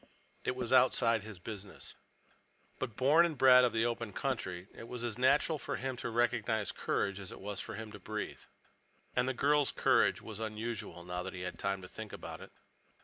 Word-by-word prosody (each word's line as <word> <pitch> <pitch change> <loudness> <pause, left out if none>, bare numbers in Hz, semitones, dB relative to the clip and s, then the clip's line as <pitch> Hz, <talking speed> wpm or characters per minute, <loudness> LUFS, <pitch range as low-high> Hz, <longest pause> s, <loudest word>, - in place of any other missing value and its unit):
It 130 - -1
was 125 -1 -2
outside 115 -3 +4
his 105 -1 -9
business. 100 +1 -8 0.9
But, 120 -5 -3
born 145 +7 +5
and 165 -4 0
bred 125 -1 +8
of 125 - +4
the 115 +1 +2
open 115 -3 -2
country, 95 -9 -3
it 115 - -10
was 120 0 -6
as 120 -1 -3
natural 145 +4 +3
for - - -3
him 130 0 -3
to - - -3
recognize 115 -2 +1
courage 100 0 -1
as 95 -2 -8
it - - -9
was 100 0 -5
for - - -5
him 110 0 -7
to 105 - -9
breathe. 105 +2 -5 0.7
And 125 +1 +2
the 130 - -2
girl's 145 +2 +3
courage - - +3
was 110 -2 -8
unusual, 110 -4 -4
now 90 0 -4
that 90 - -6
he 90 - -6
had 90 - -5
time 95 -1 -1
to - - -7
think 110 +2 -8
about - - -7
it. - - -11
115 Hz, 205 wpm, -33 LUFS, 100-130 Hz, 0.9 s, bred